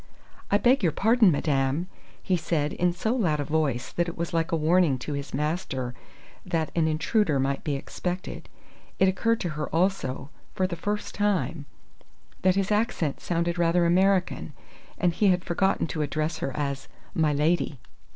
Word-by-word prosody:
"I 205 Hz, -, +4 dB
beg 245 Hz, +5 st, +3 dB
your 170 Hz, -5 st, +2 dB
pardon, 220 Hz, +5 st, +4 dB
madame!" 140 Hz, +2 st, 0 dB, 0.4 s
he 185 Hz, -, +1 dB
said 155 Hz, -3 st, -1 dB
in 180 Hz, 0 st, +1 dB
so 220 Hz, +7 st, -1 dB
loud 170 Hz, -, +1 dB
a -, -, 0 dB
voice 145 Hz, -5 st, -1 dB
that 175 Hz, 0 st, 0 dB
it 170 Hz, -, -9 dB
was 170 Hz, 0 st, -3 dB
like 165 Hz, -1 st, 0 dB
a -, -, +2 dB
warning 160 Hz, -2 st, +3 dB
to 145 Hz, +4 st, -5 dB
his 140 Hz, 0 st, -5 dB
master 140 Hz, -4 st, -2 dB, 0.5 s
that 160 Hz, -2 st, -1 dB
an 165 Hz, -2 st, +3 dB
intruder 160 Hz, 0 st, +1 dB
might 135 Hz, +1 st, -1 dB
be 145 Hz, -, -1 dB
expected. 180 Hz, +6 st, -5 dB, 0.5 s
It 190 Hz, -, +4 dB
occurred 225 Hz, +5 st, +1 dB
to 175 Hz, -, -1 dB
her 150 Hz, -1 st, -4 dB
also, 160 Hz, -6 st, -1 dB, 0.2 s
for 185 Hz, -, +1 dB
the 185 Hz, -2 st, -2 dB
first 205 Hz, +5 st, -3 dB
time, 165 Hz, -8 st, 0 dB, 0.7 s
that 185 Hz, 0 st, +3 dB
his 195 Hz, +1 st, 0 dB
accent 210 Hz, -, 0 dB
sounded 170 Hz, 0 st, -1 dB
rather 170 Hz, +1 st, +3 dB
American, 185 Hz, +2 st, +2 dB, 0.4 s
and 175 Hz, -2 st, +2 dB
he 205 Hz, +4 st, +2 dB
had 180 Hz, -1 st, +2 dB
forgotten 190 Hz, +2 st, +1 dB
to 155 Hz, -, -3 dB
address 155 Hz, +2 st, -1 dB
her 135 Hz, -, -2 dB
as 140 Hz, -2 st, -3 dB, 0.3 s
"my 155 Hz, -2 st, +2 dB
lady." 150 Hz, 0 st, +1 dB
170 Hz, 170 wpm, -26 LUFS, 150-185 Hz, 0.7 s, I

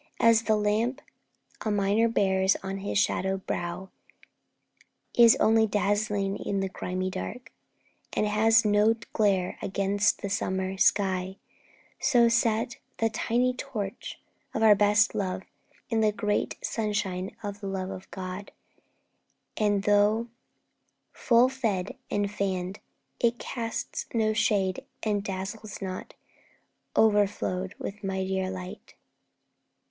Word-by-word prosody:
As 230 Hz, -1 st, +5 dB
the 220 Hz, -, +3 dB
lamp 215 Hz, +5 st, 0 dB, 0.6 s
A 220 Hz, -, -1 dB
miner 205 Hz, +2 st, +2 dB
bears 190 Hz, -3 st, +2 dB
upon 195 Hz, 0 st, -5 dB
his 200 Hz, +1 st, -2 dB
shadowed 190 Hz, -1 st, 0 dB
brow 175 Hz, +2 st, -4 dB, 1.2 s
Is 235 Hz, -1 st, +8 dB
only 220 Hz, 0 st, +4 dB
dazzling 205 Hz, -1 st, 0 dB
in 200 Hz, -, -2 dB
the 195 Hz, 0 st, -1 dB
grimy 185 Hz, 0 st, -3 dB
dark, 240 Hz, +4 st, -6 dB, 0.6 s
And -, -, 0 dB
has 220 Hz, +2 st, +4 dB
no 210 Hz, +2 st, +4 dB, 0.2 s
glare 195 Hz, -4 st, +1 dB
against 200 Hz, +1 st, +1 dB
the -, -, -1 dB
summer 190 Hz, -1 st, -1 dB
sky, 190 Hz, -1 st, +2 dB, 0.6 s
So, 240 Hz, -3 st, +4 dB
set 230 Hz, 0 st, +1 dB, 0.2 s
the 225 Hz, 0 st, +1 dB
tiny 245 Hz, +3 st, +1 dB
torch 230 Hz, -5 st, -6 dB, 0.4 s
of 220 Hz, -, +1 dB
our 215 Hz, -1 st, +8 dB
best 205 Hz, +1 st, +3 dB
love 190 Hz, -3 st, -2 dB, 0.5 s
In 225 Hz, -1 st, +2 dB
the 215 Hz, -1 st, +3 dB
great 210 Hz, 0 st, -1 dB
sunshine 200 Hz, -4 st, -2 dB
of 205 Hz, 0 st, -5 dB
the 200 Hz, -, -6 dB
love 190 Hz, -1 st, -3 dB
of 190 Hz, -1 st, -9 dB
God, 185 Hz, +1 st, -6 dB, 1.0 s
And, 205 Hz, -2 st, +1 dB
though 210 Hz, +3 st, +3 dB, 0.8 s
full 240 Hz, 0 st, +4 dB
fed 245 Hz, -4 st, -2 dB
and 205 Hz, -1 st, -1 dB
fanned, 190 Hz, -2 st, -2 dB, 0.4 s
it 235 Hz, 0 st, +2 dB
casts 230 Hz, -3 st, -4 dB
no 215 Hz, -1 st, +2 dB
shade 200 Hz, -4 st, +1 dB, 0.2 s
And 205 Hz, -2 st, 0 dB
dazzles 200 Hz, +2 st, -5 dB
not, 185 Hz, -2 st, -6 dB, 0.8 s
o'erflowed 205 Hz, -3 st, +2 dB
with 205 Hz, +1 st, -7 dB
mightier 190 Hz, -1 st, -1 dB
light.' 185 Hz, +2 st, -8 dB
205 Hz, 120 wpm, -27 LUFS, 190-220 Hz, 1.2 s, Is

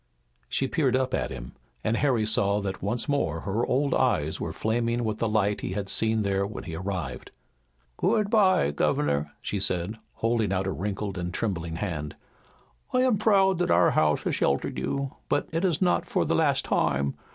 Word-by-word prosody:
She 135 Hz, -, 0 dB
peered 135 Hz, -3 st, +1 dB
up 130 Hz, 0 st, 0 dB
at -, -, 0 dB
him, 60 Hz, -2 st, -7 dB, 0.3 s
and 110 Hz, -, +1 dB
Harry 125 Hz, -5 st, +2 dB
saw 100 Hz, -1 st, +2 dB
that 95 Hz, -1 st, -4 dB
once 115 Hz, +7 st, -2 dB
more 85 Hz, -, 0 dB
her 105 Hz, +4 st, -1 dB
old 135 Hz, +2 st, +1 dB
eyes 80 Hz, -, +1 dB
were -, -, -2 dB
flaming 115 Hz, +2 st, 0 dB
with 110 Hz, -1 st, -2 dB
the 115 Hz, -, 0 dB
light 105 Hz, -1 st, +1 dB
he -, -, -3 dB
had 100 Hz, 0 st, -3 dB
seen 110 Hz, 0 st, +1 dB
there 100 Hz, -1 st, +1 dB
when 100 Hz, +1 st, -5 dB
he 80 Hz, -, -6 dB
arrived. 90 Hz, -6 st, -4 dB, 0.7 s
"Good 210 Hz, -1 st, +1 dB
bye, 190 Hz, -, +4 dB
governor," 75 Hz, 0 st, 0 dB
she -, -, -2 dB
said, 95 Hz, +5 st, -1 dB
holding 115 Hz, -3 st, 0 dB
out 95 Hz, 0 st, 0 dB
a 95 Hz, -, -1 dB
wrinkled 100 Hz, 0 st, -3 dB
and 90 Hz, 0 st, -3 dB
trembling 85 Hz, -5 st, -2 dB
hand. 80 Hz, -5 st, -4 dB, 0.8 s
"I 255 Hz, -, +3 dB
am 245 Hz, -6 st, +2 dB
proud 195 Hz, -4 st, +4 dB
that 175 Hz, 0 st, +1 dB
our -, -, +5 dB
house 75 Hz, -1 st, +2 dB
has -, -, -1 dB
sheltered 70 Hz, -1 st, 0 dB
you, 140 Hz, -, -3 dB
but -, -, +1 dB
it 165 Hz, +3 st, -1 dB
is 180 Hz, -2 st, +2 dB
not 180 Hz, -, +2 dB
for -, -, +1 dB
the -, -, 0 dB
last -, -, +2 dB
time. 70 Hz, 0 st, +1 dB
105 Hz, 190 wpm, -27 LUFS, 90-130 Hz, 0.8 s, our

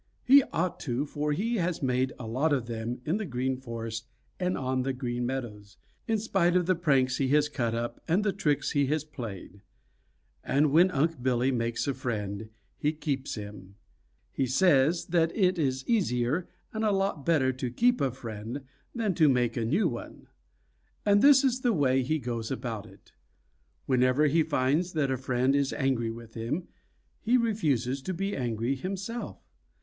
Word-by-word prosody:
He 275 Hz, +2 st, +8 dB
ought 180 Hz, +2 st, -1 dB
to, 130 Hz, +1 st, -2 dB
for 150 Hz, +1 st, -2 dB
he 225 Hz, +10 st, 0 dB
has 170 Hz, -4 st, -1 dB
made 130 Hz, 0 st, +1 dB
a 125 Hz, -, -7 dB
lot 135 Hz, +8 st, +1 dB
of 130 Hz, -4 st, 0 dB
them 115 Hz, +1 st, -4 dB
in 165 Hz, +6 st, +1 dB
the 215 Hz, -, -3 dB
Green 130 Hz, 0 st, -1 dB
Forest 115 Hz, -2 st, -6 dB, 0.3 s
and 180 Hz, 0 st, 0 dB
on 130 Hz, -1 st, -1 dB
the 135 Hz, +1 st, -1 dB
Green 120 Hz, -1 st, -3 dB
Meadows, 105 Hz, -6 st, -6 dB, 0.3 s
in 225 Hz, -, +2 dB
spite 195 Hz, -5 st, +1 dB
of 180 Hz, -1 st, +3 dB
the 185 Hz, -, +3 dB
pranks 135 Hz, -7 st, +2 dB
he 135 Hz, -, +1 dB
has 150 Hz, +2 st, +3 dB
cut 120 Hz, -6 st, -2 dB
up 120 Hz, +1 st, -4 dB
and 180 Hz, +5 st, +2 dB
the 205 Hz, -2 st, +1 dB
tricks 150 Hz, -8 st, 0 dB
he 140 Hz, -2 st, +2 dB
has 150 Hz, +1 st, 0 dB
played. 105 Hz, -, -8 dB, 0.8 s
And 145 Hz, +2 st, +2 dB
when 170 Hz, +5 st, +6 dB
Unc' 160 Hz, -3 st, 0 dB
Billy 130 Hz, +1 st, +1 dB
makes 115 Hz, +1 st, -1 dB
a 140 Hz, -, +1 dB
friend, 110 Hz, -5 st, -4 dB, 0.3 s
he 150 Hz, +1 st, +1 dB
keeps 145 Hz, -3 st, -3 dB
him. 100 Hz, -3 st, -9 dB, 0.6 s
He 135 Hz, -, -1 dB
says 150 Hz, +3 st, +3 dB
that 165 Hz, -1 st, +2 dB
it 185 Hz, -3 st, +2 dB
is 130 Hz, -3 st, -1 dB
easier 160 Hz, -, +1 dB, 0.3 s
and 220 Hz, 0 st, -2 dB
a 215 Hz, -, +3 dB
lot 195 Hz, -6 st, 0 dB
better 135 Hz, -5 st, +2 dB
to 125 Hz, 0 st, -3 dB
keep 245 Hz, -, +2 dB
a 135 Hz, -, +2 dB
friend 115 Hz, 0 st, -6 dB, 0.3 s
than 220 Hz, -5 st, 0 dB
to 155 Hz, -3 st, +4 dB
make 125 Hz, -3 st, +1 dB
a 115 Hz, -3 st, -1 dB
new 160 Hz, -, +2 dB
one. -, -, -7 dB, 0.8 s
And 205 Hz, 0 st, +5 dB
this 280 Hz, -1 st, +7 dB
is 255 Hz, -2 st, +2 dB
the 245 Hz, -3 st, +2 dB
way 135 Hz, -6 st, +2 dB
he 155 Hz, +5 st, 0 dB
goes 120 Hz, -4 st, -4 dB
about 115 Hz, -5 st, -4 dB
it: -, -, -19 dB, 0.7 s
Whenever 130 Hz, +2 st, +3 dB
he 155 Hz, +3 st, +3 dB
finds 155 Hz, +3 st, +1 dB
that 145 Hz, -4 st, +1 dB
a -, -, +1 dB
friend 130 Hz, +1 st, +1 dB
is 140 Hz, -1 st, +1 dB
angry 130 Hz, -5 st, 0 dB
with 115 Hz, 0 st, -9 dB
him, 120 Hz, +10 st, -3 dB, 0.5 s
he 240 Hz, +3 st, +3 dB
refuses 145 Hz, -, 0 dB
to 185 Hz, +7 st, -4 dB
be 195 Hz, +3 st, -2 dB
angry 120 Hz, 0 st, -1 dB
himself. 195 Hz, -, -5 dB
135 Hz, 180 wpm, -28 LUFS, 120-175 Hz, 0.8 s, He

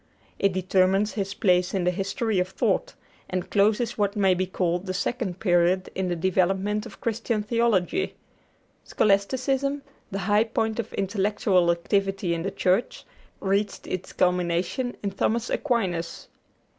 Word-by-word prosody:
It 200 Hz, -, +3 dB
determines 190 Hz, +2 st, +2 dB
his 200 Hz, -1 st, -3 dB
place 180 Hz, -1 st, +2 dB
in 190 Hz, -, 0 dB
the 180 Hz, -, +2 dB
history 195 Hz, +3 st, -1 dB
of 180 Hz, -, +1 dB
thought, 185 Hz, -, -1 dB, 0.3 s
and 185 Hz, -1 st, -2 dB
closes 215 Hz, +3 st, +2 dB
what 205 Hz, 0 st, +1 dB
may 195 Hz, -3 st, +4 dB
be 185 Hz, +1 st, -1 dB
called 180 Hz, 0 st, -1 dB
the 185 Hz, -, -2 dB
second 195 Hz, -4 st, -2 dB
period 180 Hz, -1 st, +2 dB
in 190 Hz, -1 st, -2 dB
the 175 Hz, -, -1 dB
development 190 Hz, +4 st, 0 dB
of 205 Hz, -, -14 dB
Christian 225 Hz, -1 st, -1 dB
theology. 230 Hz, -, +1 dB, 0.7 s
Scholasticism, 265 Hz, +7 st, +1 dB, 0.3 s
the 195 Hz, -, -4 dB
high 210 Hz, +2 st, +3 dB
point 220 Hz, 0 st, -1 dB
of 230 Hz, -1 st, -3 dB
intellectual 195 Hz, -2 st, +1 dB
activity 195 Hz, +1 st, 0 dB
in 165 Hz, -, -2 dB
the 195 Hz, -, -2 dB
Church, 190 Hz, +5 st, 0 dB, 0.3 s
reached 200 Hz, +1 st, -1 dB
its 185 Hz, 0 st, -5 dB
culmination 180 Hz, +7 st, 0 dB
in 200 Hz, -, -1 dB
Thomas 225 Hz, +4 st, -1 dB
Aquinas. 190 Hz, -, -1 dB
195 Hz, 145 wpm, -25 LUFS, 185-220 Hz, 0.7 s, may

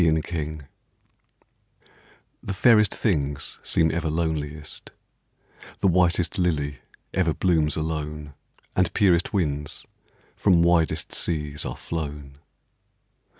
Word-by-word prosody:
62 80 Hz, -1 st, +3 dB
BEAUTY 75 Hz, -2 st, -4 dB, 1.8 s
The 100 Hz, -, -4 dB
fairest 105 Hz, 0 st, +5 dB
things 70 Hz, -, -1 dB
seem 80 Hz, -1 st, +2 dB
ever 80 Hz, -1 st, -1 dB
loneliest: 75 Hz, -2 st, -3 dB, 0.9 s
The -, -, +1 dB
whitest 90 Hz, -1 st, +2 dB
lily 75 Hz, -6 st, 0 dB, 0.4 s
ever 85 Hz, -4 st, +1 dB
blooms 80 Hz, -5 st, +2 dB
alone, 75 Hz, -2 st, -4 dB, 0.4 s
And 90 Hz, -2 st, +2 dB
purest 90 Hz, -5 st, +3 dB
winds 75 Hz, -7 st, -2 dB, 0.5 s
from 90 Hz, -4 st, +4 dB
widest 85 Hz, -2 st, +2 dB
seas 75 Hz, -3 st, -2 dB
are -, -, -5 dB
flown. 75 Hz, -3 st, -6 dB
80 Hz, 100 wpm, -25 LUFS, 75-85 Hz, 1.8 s, fairest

